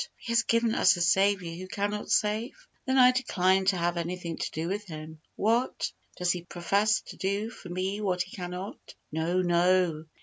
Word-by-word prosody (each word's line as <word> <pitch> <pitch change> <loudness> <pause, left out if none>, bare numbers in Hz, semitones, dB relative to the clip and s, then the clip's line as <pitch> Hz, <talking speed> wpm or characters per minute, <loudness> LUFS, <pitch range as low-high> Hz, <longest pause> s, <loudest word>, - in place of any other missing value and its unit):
He 230 - -6
has 230 -1 +4
given 230 0 +1
us 195 - +4
a - - -3
Saviour 190 0 +2
who 185 +2 -7
cannot 205 +2 -3
save? 225 - 0 0.2
Then 260 +1 +2
I 250 -1 +8
decline 190 -7 +2
to 190 -1 +3
have 175 0 0
anything 170 0 -3
to - - -3
do 160 +2 -4
with 200 +3 -2
Him. 155 -2 -9
What! 230 +4 0 0.3
does 180 -1 +1
He 180 - -2
profess 200 +5 +1
to - - -12
do 200 +4 -1
for 185 - -11
me 190 +3 -2
what 185 -3 0
He 185 - -15
cannot? 180 +1 -7 0.2
No, 165 +4 0
no. 175 -2 +2
185 Hz, 190 wpm, -28 LUFS, 175-210 Hz, 0.3 s, I